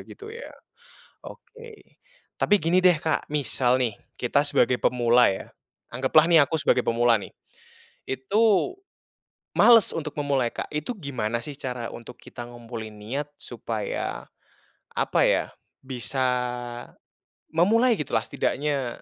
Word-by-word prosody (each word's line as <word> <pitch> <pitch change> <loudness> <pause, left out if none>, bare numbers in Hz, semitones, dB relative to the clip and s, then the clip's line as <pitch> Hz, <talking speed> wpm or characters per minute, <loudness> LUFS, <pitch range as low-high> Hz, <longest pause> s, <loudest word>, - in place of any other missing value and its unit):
gitu 425 +1 -10
ya. 470 +2 -8 0.8
Oke, 465 -2 -14 0.4
tapi 205 - +4
gini 170 +3 +3
deh 180 -1 +5
Kak, 160 0 -1
misal 135 -4 +1
nih 120 -5 -1 0.2
kita 140 +3 +1
sebagai 125 -3 +2
pemula 120 0 +4
ya, 95 - -7 0.4
anggaplah 145 +7 +3
nih 165 - +7
aku 160 - -2
sebagai 125 - +3
pemula 115 -1 +3
nih. - - -10 0.8
Itu, 205 - +1 0.8
males 230 -4 +6
untuk 155 -2 -5
memulai 140 -4 0
Kak, - - -7
itu 155 +11 -3
gimana 120 - -3
sih 145 - -6
cara 125 -3 -5
untuk 120 +1 -10
kita 120 0 -10
ngumpulin 115 -2 -8
niat 130 +8 -5
supaya, 115 -3 -4 0.7
apa - - 0
ya, - - +3 0.4
bisa 130 0 -2 1.2
memulai 225 +10 +4
gitulah 115 -6 -1
setidaknya 140 +4 -1
135 Hz, 125 wpm, -25 LUFS, 120-165 Hz, 1.2 s, nih